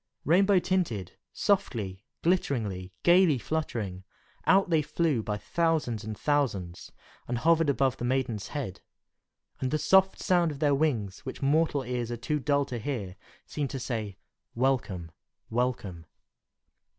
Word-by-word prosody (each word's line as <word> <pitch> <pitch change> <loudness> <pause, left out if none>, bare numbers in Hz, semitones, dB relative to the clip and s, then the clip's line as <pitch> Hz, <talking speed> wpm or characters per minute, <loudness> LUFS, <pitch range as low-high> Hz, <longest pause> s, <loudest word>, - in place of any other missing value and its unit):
Rainbow 195 +5 +5
tinted, 170 - 0 0.2
softly, 110 - -1 0.2
glitteringly, 110 - 0
gayly 175 -4 +5
fluttering, 115 -11 -3 0.4
out 190 -1 +4
they 160 -2 +4
flew 150 -4 0
by 105 -1 -3
thousands 155 -5 0
and 110 -1 -5
thousands, 105 - -1 0.4
and 120 - -1
hovered 165 +3 +3
about 135 -2 +1
the - - -4
maiden's 120 -4 -1
head; 125 -11 -5 0.8
and 130 - -1
the 155 - +1
soft 190 +4 +4
sound 175 -2 +2
of 145 - -5
their 145 0 +2
wings, 120 -10 0
which 130 0 -7
mortal 145 0 +2
ears 120 -2 -3
are 120 - -3
too 150 +6 -1
dull 140 0 +1
to 125 -3 -5
hear, 110 -7 -4 0.3
seemed 145 -3 -3
to 135 - -4
say, 110 -6 -4 0.4
"Welcome! 115 -10 0 0.4
welcome!" 110 -9 -2
130 Hz, 140 wpm, -28 LUFS, 110-155 Hz, 0.8 s, Rainbow